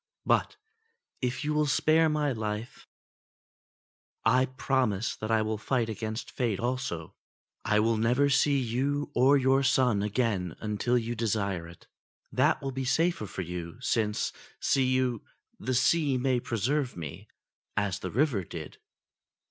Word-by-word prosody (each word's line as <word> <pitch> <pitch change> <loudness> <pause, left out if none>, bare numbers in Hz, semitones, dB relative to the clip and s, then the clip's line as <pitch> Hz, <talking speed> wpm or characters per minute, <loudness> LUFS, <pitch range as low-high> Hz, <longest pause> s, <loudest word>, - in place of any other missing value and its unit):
But - - +1 0.6
if 125 +3 -1
you 150 - 0
will 150 0 +2
spare 160 +3 +3
my 150 -2 +1
life 110 0 -5 1.4
I 130 +1 +4
promise 130 -5 0
that 110 - -5
I 110 -1 +3
will 110 -1 -2
fight 120 0 0
against 110 +2 -4
Fate 115 -6 -1
also. 120 -10 -3 0.5
I 105 - +2
will 115 0 +2
never 120 +6 +3
see 140 0 +3
you 135 +4 -1
or 135 +3 +5
your 135 0 +3
son 130 -6 +3
again 105 -5 -1
until 110 +3 0
you 120 0 -2
desire 100 -6 -1
it. 85 0 -15 0.5
That - - +2
will 135 - -2
be 135 +1 -3
safer 140 -2 +1
for 95 - -5
you; 85 +2 -6
since, 110 -4 0 0.3
see 135 -2 +2
you, 130 -3 +1 0.4
the 130 +3 -1
sea 140 +1 +3
may 125 0 +1
preserve 125 +2 -1
me, 75 -5 -7 0.5
as 100 -1 0
the 95 - -4
river 125 - +1
did." - - -8
120 Hz, 145 wpm, -29 LUFS, 105-135 Hz, 1.4 s, or